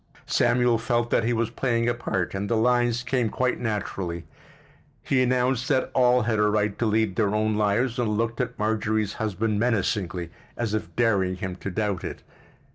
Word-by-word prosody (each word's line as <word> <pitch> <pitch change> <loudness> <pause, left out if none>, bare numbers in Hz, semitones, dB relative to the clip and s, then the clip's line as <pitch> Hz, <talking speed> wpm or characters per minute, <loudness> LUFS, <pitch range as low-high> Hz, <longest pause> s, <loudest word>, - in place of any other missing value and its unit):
Samuel 120 -2 +2
felt 120 +1 0
that 115 - +2
he 120 - +1
was 115 -1 0
playing 120 -1 0
a 120 - +2
part 95 -6 -2
and 100 +1 -3
the 115 - +2
lines 120 +1 +2
came 120 -2 0
quite 125 +4 0
naturally: 100 -6 -3 0.8
he 130 - +2
announced 125 0 +1
that 130 -2 +1
all 125 -1 +4
had 110 -1 0
a 105 - +4
right 105 -1 0
to 120 - +1
lead 110 -3 +1
their 105 -2 +1
own 110 0 +1
lives 110 +4 +1
and 120 -3 +1
looked 115 +1 -1
at 125 - -4
Marjorie's 105 -1 0
husband 110 0 -1
menacingly, 95 -6 -1 0.3
as 115 -3 -2
if 110 - -3
daring 100 -6 +2
him 95 -1 -5
to 100 - -5
doubt 100 -1 -2
it. - - -6
110 Hz, 185 wpm, -25 LUFS, 105-120 Hz, 0.8 s, all